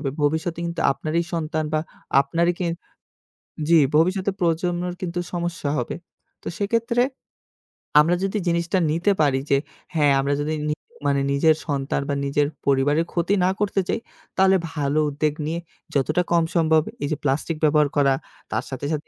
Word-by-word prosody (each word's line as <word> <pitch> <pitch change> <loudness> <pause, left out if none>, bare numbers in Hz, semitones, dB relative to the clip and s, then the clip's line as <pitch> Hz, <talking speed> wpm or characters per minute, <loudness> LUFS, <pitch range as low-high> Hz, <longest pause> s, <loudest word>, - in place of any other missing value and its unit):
হবে? 140 -2 -2
ভবিষ্যতে 160 +3 0
কিন্তু 170 0 -4
আপনারই 165 +4 -1
সন্তান 155 -1 -1
বা 155 - +3 0.4
আপনারই 170 +5 +1
কিন 170 -2 0 1.0
জি, 170 -1 +6 0.2
ভবিষ্যতে 185 +5 +2
প্রজন্মের 175 +1 0
কিন্তু 175 -1 -3
সমস্যা 170 -4 -2
হবে। - - -2 0.5
তো - - -7
সেক্ষেত্রে 230 +4 +1 1.0
আমরা 170 +4 +4
যদি 195 +2 0
জিনিসটা 170 +2 +1
নিতে 170 +6 +2
পারি 135 -3 +3
যে 140 - +5 0.4
হ্যাঁ, 145 -3 +4
আমরা 140 +1 +1
যদি 155 +2 -1
নি 150 - +1 0.3
মানে 140 -1 +2
নিজের 155 +3 +4
সন্তান 140 -1 -1
বা 140 - +1
নিজের 145 +1 +1 0.2
পরিবারের 145 +4 +3
ক্ষতি 175 +3 +1
না - - +3
করতে 200 -1 +1
চাই 230 - 0 0.4
তাহলে 190 0 +5 0.2
ভালো 145 0 0
উদ্যোগ 150 +1 0
নিয়ে 165 +2 -2 0.4
যতটা 155 +6 +2
কম 170 -1 +4
সম্ভব 160 -1 +4 0.2
এই 145 - 0
যে 150 - 0
প্লাস্টিক 150 +3 0
ব্যবহার 150 -1 +4
করা 140 -2 +4 0.4
তার - - -1
সাথে, - - -5
সাথে 150 - -4
160 Hz, 160 wpm, -23 LUFS, 145-175 Hz, 1.0 s, জি